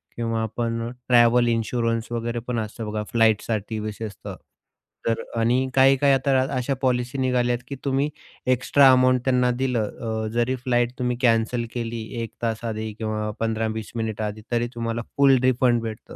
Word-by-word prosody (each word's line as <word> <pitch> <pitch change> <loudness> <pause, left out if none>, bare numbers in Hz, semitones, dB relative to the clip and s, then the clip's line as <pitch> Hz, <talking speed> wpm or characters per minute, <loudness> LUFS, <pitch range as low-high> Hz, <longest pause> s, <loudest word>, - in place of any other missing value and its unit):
किंवा 115 -1 -1
आपण 115 +1 -2 0.2
travel 120 0 +5
insurance 115 0 -1
वगैरे 120 0 -2
पण 120 -2 -1
असतं 110 +1 -5
बघा 105 0 -2
फ्लाइटसाठी 110 -1 +1
विशेषतः 105 0 -6 0.7
तर 115 - +1 0.2
आणि 125 +3 +2
काही-काही 135 +1 +5
आता 135 0 +2 0.2
अशा 130 +2 0
पॉलिसी 125 0 0
निघाल्यात, 125 -2 +1
की 140 - -5
तुम्ही 140 +2 +1 0.4
एक्स्ट्रा 135 +2 +5
अमाउंट 130 -1 +4
त्यांना 125 -1 +3
दिलं 120 -5 0 0.4
अ, - - -2
जरी 120 +2 +1
फ्लाइट 120 -1 0
तुम्ही 125 -1 -1
कॅन्सल 115 0 +2
केली 115 -1 -3 0.2
1 115 - -6
तास 115 -1 -1
आधी 110 -1 -3
किंवा 110 0 -3
15-20 110 -1 -2
मिनिटं 110 -1 -2
आधी, 105 +1 -4
तरी 120 0 +1
तुम्हाला 115 0 -2 0.2
फुल 135 -2 +6
रिफंड 125 -2 +3
भेटतं. 110 -1 -7
120 Hz, 150 wpm, -24 LUFS, 115-125 Hz, 0.7 s, फुल